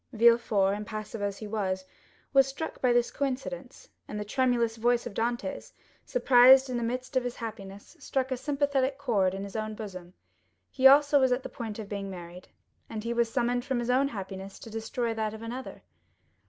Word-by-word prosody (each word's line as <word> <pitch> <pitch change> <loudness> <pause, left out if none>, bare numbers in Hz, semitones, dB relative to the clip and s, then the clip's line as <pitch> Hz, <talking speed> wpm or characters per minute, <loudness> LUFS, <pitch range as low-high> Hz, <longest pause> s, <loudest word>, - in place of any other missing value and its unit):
Villefort, 225 -4 +4
impassive 215 +1 -6
as 200 -1 -2
he 215 - -7
was, 190 -3 -2 0.5
was 270 -1 +6
struck 275 +4 -6
with 245 -2 +3
this 240 0 +2
coincidence; 275 - -4 0.2
and 210 - -5
the 210 - -4
tremulous 235 0 +1
voice 240 +1 +2
of 240 - -6
Dantès, 240 +6 -3 0.3
surprised 260 - +6
in 245 - -1
the - - -2
midst 255 +3 -4
of 260 - +2
his 245 -1 -4
happiness, 205 - -8
struck 265 -2 -2
a - - +1
sympathetic 275 -1 0
chord 205 -9 +1
in 195 - -5
his 200 +1 -8
own 215 0 -3
bosom—he 195 +6 -2
also 285 +1 +6
was 260 -1 +3
on 250 +1 +1
the - - -6
point 225 -4 -6
of 220 -2 -6
being 200 -1 -5
married, 180 -1 -9 0.4
and 215 -1 -5
he 235 +1 -2
was 235 -1 +1
summoned 245 0 0
from 265 -1 -1
his 240 +1 0
own 265 +2 +3
happiness 195 -4 -7
to 225 - -11
destroy 225 +1 -2
that 220 -1 -2
of 220 - -10
another. 245 - -7
235 Hz, 190 wpm, -28 LUFS, 210-260 Hz, 0.5 s, was